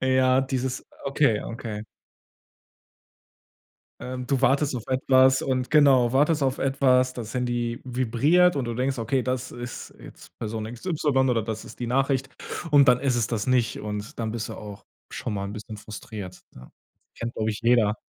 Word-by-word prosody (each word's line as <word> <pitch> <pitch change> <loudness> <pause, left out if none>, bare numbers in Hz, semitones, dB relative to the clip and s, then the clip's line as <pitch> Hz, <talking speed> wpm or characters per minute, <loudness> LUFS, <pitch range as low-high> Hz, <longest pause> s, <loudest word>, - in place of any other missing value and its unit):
Ja, 130 0 +3
dieses 130 -1 -3 0.2
okay 140 -5 +2
okay. 110 -2 -6 2.2
Ähm, 125 0 -5
du 135 0 0
wartest 135 +1 +2
auf 115 - -6
etwas 130 0 +4
und 130 -1 -1
genau, 135 -5 +5
wartest 150 +3 +3
auf 135 0 0
etwas. 130 -2 +2
Das 115 -3 -7
Handy 120 -1 -1
vibriert, 130 +8 +3
und 140 -3 -1
du 120 - -3
denkst: 130 +2 -1
„Okay, 125 +3 0
das 130 0 -2
ist 120 0 -8
jetzt - - -14
Person 110 -1 -4
X 120 +8 -10
Y“ 145 -6 +1
oder 120 -3 +1
„das 110 0 -5
ist - - -13
die 120 - -2
Nachricht“, 135 +1 +1 0.4
und 145 -2 +6
dann 125 0 +5
ist 135 -3 +1
es 115 -3 +1
das 110 -2 -2
nicht, 125 -3 +1
und 105 0 -6
dann 115 -2 -2
bist 115 -1 -4
du - - -6
auch 105 -2 -10 0.3
schon 105 - -4
mal 100 -1 -3
’n 100 - -6
bisschen 110 0 -8
frustriert, 105 -3 -8
ja. 65 0 -13 0.5
Kennt, 115 0 -5
glaub 110 0 -1
ich, 105 -1 -3
jeder. 115 -3 +3
125 Hz, 175 wpm, -25 LUFS, 115-130 Hz, 2.2 s, und